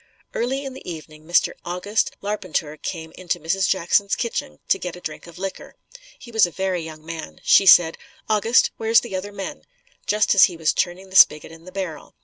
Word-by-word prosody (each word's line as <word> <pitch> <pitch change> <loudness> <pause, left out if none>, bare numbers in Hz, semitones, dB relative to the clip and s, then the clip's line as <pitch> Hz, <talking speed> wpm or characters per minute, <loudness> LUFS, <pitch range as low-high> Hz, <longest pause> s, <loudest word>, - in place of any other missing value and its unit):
Early 265 +4 -2
in 270 - -6
the 255 -8 -8
evening, 155 -1 -11
Mr. 175 - +2
August 180 +5 -1
Larpenteur 185 -7 -3
came 160 0 -6
into 180 0 -4
Mrs. 190 +5 0
Jackson's 195 +2 +2
kitchen 225 - -4
to - - +2
get 180 -1 -5
a - - -10
drink 155 -1 -8
of 170 - -13
liquor. 195 +1 -7 0.4
He 240 - -13
was 220 -5 +4
a - - -7
very 185 0 -2
young 155 -1 -10
man. 160 - -8
She 195 - +5
said, 170 -2 +7 0.3
"August, 220 +3 +3
where's 225 0 +4
the 225 -5 -6
other 195 +2 -4
men?" 195 -1 -7 0.5
just 210 0 +3
as 195 - +8
he 175 - -5
was 160 -1 +1
turning 185 +2 -2
the - - -10
spigot 150 -3 +6
in 165 +1 -15
the 185 - -11
barrel. 180 -7 -6
185 Hz, 200 wpm, -22 LUFS, 165-205 Hz, 0.5 s, as